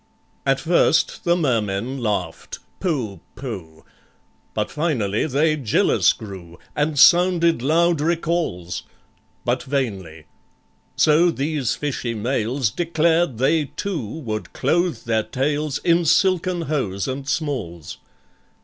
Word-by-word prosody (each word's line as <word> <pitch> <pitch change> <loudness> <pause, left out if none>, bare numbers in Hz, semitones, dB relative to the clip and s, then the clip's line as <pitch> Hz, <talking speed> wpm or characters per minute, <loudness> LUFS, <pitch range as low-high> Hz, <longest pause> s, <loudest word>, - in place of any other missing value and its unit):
At - - +3
first - - +2
the 175 0 +4
Mermen 120 - -1
laughed, 100 -8 -3 0.2
"Pooh! 130 - -2 0.2
pooh!" 90 - -8 0.7
But - - -1
finally 130 -9 0
they 155 +2 +2
jealous 130 -8 +3
grew, 95 -5 -9 0.2
And 150 0 0
sounded 170 -2 +5
loud 165 +3 +2
recalls; 160 - -1 0.6
But - - +1
vainly. 100 - -3 0.7
So 155 +3 +4
these 145 -4 -1
fishy 130 -5 -3
males 120 +1 -1
Declared 165 -4 +1
they 150 +5 +2
too 180 - -4
would 110 -2 -5
clothe 170 +5 0
their 110 -1 +1
tails 145 +4 -1
In 170 0 +2
silken 185 +1 +2
hose 130 - -2
and 135 +1 -4
smalls. 110 - -3
140 Hz, 110 wpm, -22 LUFS, 110-165 Hz, 0.7 s, sounded